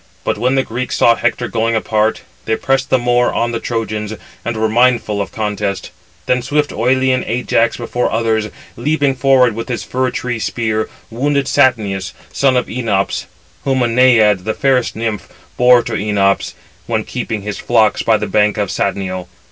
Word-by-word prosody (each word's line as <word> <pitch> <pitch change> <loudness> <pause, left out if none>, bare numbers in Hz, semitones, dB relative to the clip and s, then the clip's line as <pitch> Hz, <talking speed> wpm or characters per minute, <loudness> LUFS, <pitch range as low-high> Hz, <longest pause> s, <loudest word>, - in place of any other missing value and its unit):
But - - -1
when 130 +2 +1
the 135 - +2
Greeks 125 +2 -4
saw 115 - +5
Hector 120 +1 -1
going 115 0 0
apart, 110 0 0 0.2
they 110 - +1
pressed 135 +2 0
the 130 - +4
more 120 0 +2
on 120 0 -1
the 115 - -2
Trojans, 110 -3 -3 0.3
and 120 0 -3
were 110 0 +1
mindful 115 -2 +2
of 100 - -5
contest. 105 -3 -3 0.3
Then 125 0 +1
swift 145 +3 0
Oïlean 130 +2 +1
Ajax 115 -1 +1
before 120 +1 -2
others, 110 -1 0 0.3
leaping 145 +2 +1
forward 130 -2 +3
with 115 +4 -6
his 120 - -3
fir 130 0 -1
tree 125 -2 -3
spear, 110 -1 -1 0.2
wounded 140 +4 0
Satnius, 105 -8 +1 0.2
son 135 -2 +2
of 125 - +1
Enops, 110 -5 -1 0.4
whom 135 -2 +1
a - - +2
Naiad, 115 -5 +4
the 110 +2 -2
fairest 130 -3 +1
nymph, 110 -4 -3 0.3
bore 125 -1 +5
to 115 - -5
Enops, 100 -2 0 0.3
when 110 -2 0
keeping 110 -4 -4
his 105 0 -5
flocks 110 -3 +2
by 110 -1 +3
the 105 - -3
banks 105 +1 +2
of 100 -2 -1
Satnio. 95 -2 -2
115 Hz, 170 wpm, -16 LUFS, 105-125 Hz, 0.4 s, saw